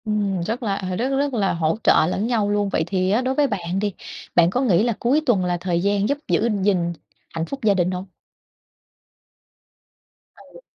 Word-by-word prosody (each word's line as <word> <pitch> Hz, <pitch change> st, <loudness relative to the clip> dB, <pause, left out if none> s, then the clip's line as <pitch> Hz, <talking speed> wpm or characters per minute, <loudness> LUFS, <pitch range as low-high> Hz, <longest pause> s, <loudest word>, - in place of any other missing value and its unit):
Ừm, 205 Hz, -4 st, -1 dB
rất 225 Hz, +7 st, -3 dB
là 200 Hz, -3 st, -1 dB, 0.2 s
rất 255 Hz, +3 st, 0 dB
rất 280 Hz, 0 st, 0 dB
là 205 Hz, -5 st, +1 dB
hỗ 165 Hz, +1 st, 0 dB
trợ -, -, +5 dB
lẫn 200 Hz, +4 st, -1 dB
nhau 220 Hz, -4 st, +1 dB
luôn. 205 Hz, -1 st, 0 dB
Vậy 160 Hz, -, 0 dB
thì 185 Hz, 0 st, 0 dB
á 220 Hz, +4 st, +2 dB
đối 260 Hz, +1 st, -1 dB
với 290 Hz, 0 st, +3 dB
bạn 185 Hz, -5 st, -3 dB
đi, 205 Hz, -1 st, -1 dB, 0.4 s
bạn 170 Hz, -1 st, +5 dB
có 245 Hz, +8 st, -1 dB
nghĩ 205 Hz, -7 st, +3 dB
là 235 Hz, 0 st, +1 dB
cuối 270 Hz, +6 st, +2 dB
tuần 200 Hz, -8 st, +2 dB
là 175 Hz, -1 st, 0 dB
thời 175 Hz, -1 st, -1 dB
gian 200 Hz, +2 st, +1 dB
giúp 285 Hz, -, +1 dB
giữ 230 Hz, -, +1 dB
gìn 180 Hz, -3 st, +1 dB, 0.4 s
hạnh 165 Hz, 0 st, -3 dB
phúc 275 Hz, +9 st, -6 dB
gia 210 Hz, -2 st, +4 dB
đình 180 Hz, -1 st, +1 dB
hông? 180 Hz, +1 st, -4 dB, 2.3 s
Ừ. -, -, -16 dB
200 Hz, 200 wpm, -22 LUFS, 180-235 Hz, 2.3 s, trợ